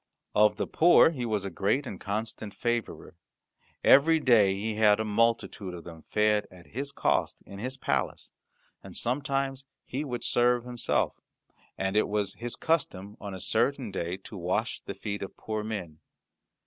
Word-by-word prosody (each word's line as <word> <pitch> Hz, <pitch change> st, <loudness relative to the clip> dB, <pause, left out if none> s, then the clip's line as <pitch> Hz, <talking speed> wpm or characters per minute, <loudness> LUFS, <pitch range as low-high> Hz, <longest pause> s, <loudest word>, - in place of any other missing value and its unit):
Of 105 Hz, 0 st, +5 dB
the -, -, -2 dB
poor 170 Hz, 0 st, +6 dB
he 125 Hz, -7 st, -3 dB
was 105 Hz, -3 st, -1 dB
a 100 Hz, -, -4 dB
great 105 Hz, -, 0 dB
and -, -, -6 dB
constant 110 Hz, 0 st, -4 dB
favourer. 120 Hz, -2 st, -2 dB, 0.7 s
Every 160 Hz, +4 st, +6 dB
day 110 Hz, -9 st, +5 dB
he 110 Hz, +3 st, -2 dB
had 105 Hz, -1 st, +4 dB
a 110 Hz, -, 0 dB
multitude 105 Hz, -3 st, 0 dB
of 85 Hz, -, -9 dB
them 80 Hz, -1 st, -10 dB
fed 105 Hz, +2 st, +1 dB
at 90 Hz, -1 st, -15 dB
his 140 Hz, +5 st, -5 dB
cost -, -, 0 dB
in 100 Hz, -, -10 dB
his 130 Hz, +4 st, -4 dB
palace, -, -, -2 dB, 0.5 s
and -, -, -7 dB
sometimes 135 Hz, +1 st, -1 dB, 0.2 s
he 135 Hz, +4 st, -3 dB
would 125 Hz, -5 st, -4 dB
serve 120 Hz, 0 st, +3 dB
himself, 125 Hz, -1 st, -1 dB, 0.6 s
and 95 Hz, +1 st, -1 dB
it 110 Hz, -, +3 dB
was 105 Hz, -1 st, -1 dB
his 120 Hz, 0 st, -5 dB
custom 105 Hz, -, -1 dB
on 100 Hz, -2 st, -6 dB
a -, -, -7 dB
certain 120 Hz, +4 st, 0 dB
day 90 Hz, -1 st, -3 dB
to -, -, -10 dB
wash 95 Hz, +5 st, -1 dB
the 100 Hz, -, -7 dB
feet 100 Hz, +1 st, -4 dB
of 100 Hz, -, -7 dB
poor 110 Hz, -1 st, -3 dB
men. 90 Hz, -8 st, -5 dB
110 Hz, 170 wpm, -28 LUFS, 100-125 Hz, 0.7 s, poor